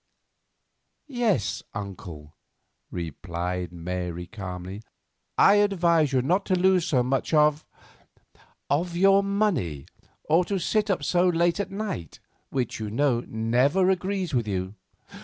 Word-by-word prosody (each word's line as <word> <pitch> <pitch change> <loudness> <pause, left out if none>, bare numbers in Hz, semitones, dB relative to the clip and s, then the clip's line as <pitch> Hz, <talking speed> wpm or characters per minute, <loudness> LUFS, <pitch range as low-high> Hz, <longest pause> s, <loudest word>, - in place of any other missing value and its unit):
"Yes, 235 - 0
uncle," 90 -7 -8 0.6
replied 90 +1 -4
Mary 90 0 -4
quite 95 - -20
calmly. 95 0 -6 0.6
"I 205 - +6
advise 170 -7 +3
you 130 -2 +2
not 180 +8 +1
to 185 - +2
lose 185 -1 +3
so 130 -4 +2
much 135 +5 0
of—of 150 +2 -3
your 195 +2 +5
money, 195 - -1 0.4
or 165 +4 +3
to 200 - -1
sit 210 +4 0
up 180 -7 0
so 180 +4 +2
late 170 +2 +1
at 200 - -2
night, 195 - -5 0.3
which, 125 -5 -2
you 110 -1 -4
know, 120 +2 +1
never 125 +12 +2
agrees 185 -2 -2
with 120 -4 0
you. 95 -1 -3
145 Hz, 125 wpm, -26 LUFS, -, 0.6 s, I